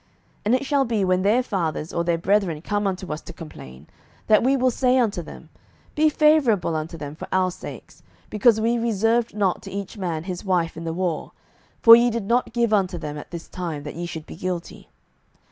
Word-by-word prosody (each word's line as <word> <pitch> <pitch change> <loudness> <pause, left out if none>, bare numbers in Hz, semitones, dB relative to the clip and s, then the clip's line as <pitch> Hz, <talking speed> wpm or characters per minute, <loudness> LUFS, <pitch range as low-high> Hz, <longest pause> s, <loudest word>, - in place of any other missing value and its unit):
07:021:022 - - -37 0.4
And 225 +4 +4
it 260 - -2
shall 275 -1 +2
be, 220 -5 0
when 185 0 +2
their 215 +6 +3
fathers 165 -8 -3
or 170 - 0
their 170 -1 +1
brethren 185 -2 +1
come 205 +1 -1
unto 185 -4 -3
us 150 - -6
to - - -10
complain, 70 - -11 0.4
that 215 -1 +5
we 270 +3 +3
will 255 0 +2
say 255 +1 +2
unto 220 -8 +1
them, 160 - -12 0.4
Be 310 +1 +3
favourable 280 - +3
unto 155 +2 -4
them 145 -2 -7
for 155 - -9
our 185 -1 +2
sakes: - - -10 0.3
because 220 +1 +4
we 230 +2 +1
reserved 230 0 +1
not 195 -4 0
to - - -9
each 200 +1 -6
man 165 -4 -3
his 180 -1 -5
wife 175 -4 0
in 165 +1 -7
the 165 - -2
war: 175 -2 -3 0.5
for 230 0 +11
ye 240 +1 +4
did 230 -3 -3
not 240 +4 +1
give 235 -1 +1
unto 190 -4 +1
them 150 -3 -6
at 150 - -9
this 170 -1 -8
time, 165 -5 -5
that 150 - -6
ye 175 +1 -5
should 160 -2 -7
be - - -10
guilty. 180 0 -5
190 Hz, 215 wpm, -23 LUFS, 170-230 Hz, 0.5 s, for